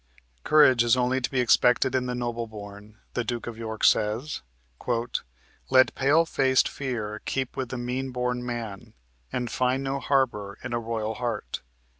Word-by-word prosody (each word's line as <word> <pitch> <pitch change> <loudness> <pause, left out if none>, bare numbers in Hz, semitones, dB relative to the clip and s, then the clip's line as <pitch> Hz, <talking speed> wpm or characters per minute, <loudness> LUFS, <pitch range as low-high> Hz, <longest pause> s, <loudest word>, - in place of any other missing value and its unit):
Courage 130 -6 +6
is 120 +1 +4
only 125 +1 +1
to 125 - -1
be 130 - -1
expected 125 +1 +4
in 130 -1 0
the 125 - -2
noble 120 -1 -3
born. 105 0 -11 0.2
The 120 - -1
Duke 120 +1 -3
of 120 - -6
York 110 -1 -6
says: 115 +8 +2 1.3
"Let 130 -1 +5
pale 145 +5 +3
faced 130 -5 +3
fear 110 -6 -4
keep 130 -2 -2
with 130 -2 -3
the 130 - -4
mean 125 +2 -3
born 125 -1 -2
man, 115 -5 -6 0.4
And 120 -2 -2
find 130 +1 +1
no 135 +1 -2
harbor 120 -9 0
in 120 -1 -4
a 120 - +1
royal 110 -1 -3
heart." 120 -3 -4
125 Hz, 165 wpm, -26 LUFS, 115-130 Hz, 1.3 s, Courage